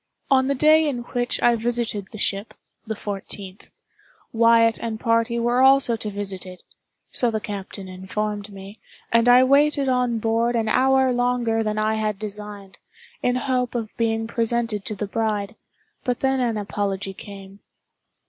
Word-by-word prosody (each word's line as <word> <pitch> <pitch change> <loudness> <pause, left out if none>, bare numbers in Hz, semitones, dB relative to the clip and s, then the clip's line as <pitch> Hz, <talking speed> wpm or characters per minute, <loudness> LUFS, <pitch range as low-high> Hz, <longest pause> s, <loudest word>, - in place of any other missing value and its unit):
On 260 -1 +4
the 280 - +1
day 310 +2 +4
in 245 -4 -4
which 245 0 0
I 240 0 +5
visited 230 -3 -2
the 220 - -9
ship 200 +1 -1 0.3
(the 220 - -3
fourteenth), 200 -1 -6 0.6
Wyatt 230 0 +4
and 225 -2 -4
party 230 0 +1
were 240 +2 +1
also 265 -3 +5
to 220 -1 -5
visit 200 -2 -4
it—so 185 +6 -4
the 220 -1 -1
captain 200 -2 -7
informed 205 +3 -4
me—and 205 +4 -2
I 250 +1 +7
waited 280 +1 +3
on 250 -2 +1
board 230 +2 0
an 225 -1 0
hour 265 +1 +3
longer 245 -2 +1
than 215 -1 -2
I 215 0 +1
had 215 -2 -1
designed, 205 -1 -8 0.4
in 245 - +1
hope 250 -1 -1
of 225 -3 -4
being 225 -1 0
presented 230 -2 -1
to 215 - -2
the 210 - -3
bride, 210 0 -2 0.5
but 250 -2 -2
then 265 0 +1
an 235 -3 0
apology 195 -1 -3
came. 195 0 -11
225 Hz, 155 wpm, -23 LUFS, 205-245 Hz, 0.6 s, I